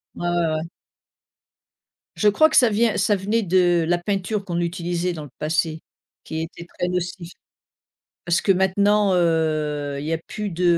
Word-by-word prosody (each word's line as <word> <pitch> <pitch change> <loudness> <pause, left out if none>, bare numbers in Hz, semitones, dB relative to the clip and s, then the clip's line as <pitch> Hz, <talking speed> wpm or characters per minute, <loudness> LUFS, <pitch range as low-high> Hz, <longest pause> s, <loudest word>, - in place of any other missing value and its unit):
Ouais, 175 - -3
ouais, 175 -1 +1
ouais. 155 - -2 1.6
Je 210 - +2
crois 310 +10 +5
que 315 - +1
ça 245 - +6
vient 220 +1 +1
ça 200 +2 +2
venait 205 +4 0
de 175 -2 +3
la 175 - +2
peinture 195 +3 -2
qu'on 175 -3 -3
utilisait 175 0 -2
dans 155 -3 -7
le 145 - -11
passé, 160 0 -1 0.4
qui 160 0 -4
était 170 +1 -8
très 180 - 0
nocive. 180 -1 -4 0.9
Parce 175 0 +1
que 195 - +3
maintenant, 200 +2 +2
heu, 155 -4 0
il 145 - -6
y 160 - -2
a - - -2
plus 210 -1 -4
de, 180 -1 -3
175 Hz, 175 wpm, -22 LUFS, 165-200 Hz, 1.6 s, ça